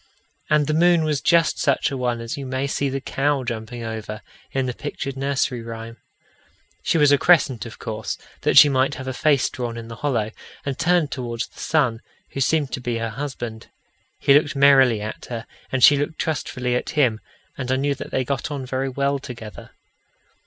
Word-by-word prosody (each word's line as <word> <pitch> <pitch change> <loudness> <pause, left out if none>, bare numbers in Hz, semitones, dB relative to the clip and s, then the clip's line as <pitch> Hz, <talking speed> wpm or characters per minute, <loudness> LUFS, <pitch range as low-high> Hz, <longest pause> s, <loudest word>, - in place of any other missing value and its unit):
And 150 -1 +3
the 155 - 0
moon 170 +1 +4
was 150 -3 0
just 170 -2 +3
such 140 -1 +1
a - - -3
one 125 -2 -1
as 115 0 -4
you 140 - -6
may 130 +1 -1
see 140 0 -1
the 135 +1 -2
cow 140 +1 0
jumping 115 0 -5
over 110 -1 -6 0.3
in 135 -2 0
the 125 - -2
pictured 140 0 -5
nursery 135 -2 -1
rhyme. 115 0 -8 0.8
She - - +1
was 145 -2 +5
a 145 - +5
crescent, 135 -9 +3
of 115 - -11
course, 110 -1 -4 0.2
that - - +2
she - - +11
might 135 0 +1
have 130 0 -7
a 130 - -2
face 140 0 +2
drawn 120 -2 -5
in 115 0 -8
the 115 - -8
hollow, 120 -7 -1 0.3
and 140 -2 -3
turned 170 -3 +2
towards 120 -3 -3
the - - -17
sun, 125 -8 +1 0.3
who 135 - -4
seemed 145 0 +1
to 130 - -4
be 120 -1 -2
her 115 -1 -3
husband. 120 -3 -6 0.5
He 140 - +4
looked 145 0 +3
merrily 135 -5 +5
at 105 - -6
her, 115 -2 -6 0.3
and 130 -2 0
she 145 - +9
looked 145 +3 -2
trustfully 130 -5 -2
at 125 - -1
him, 120 -7 +3 0.4
and 130 -1 -4
I - - +3
knew 140 +2 +1
that - - -7
they 130 - 0
got 135 +1 -2
on 140 -3 -4
very 130 +1 -2
well 140 +1 0
together. 115 -5 -9
130 Hz, 200 wpm, -22 LUFS, 120-145 Hz, 0.8 s, she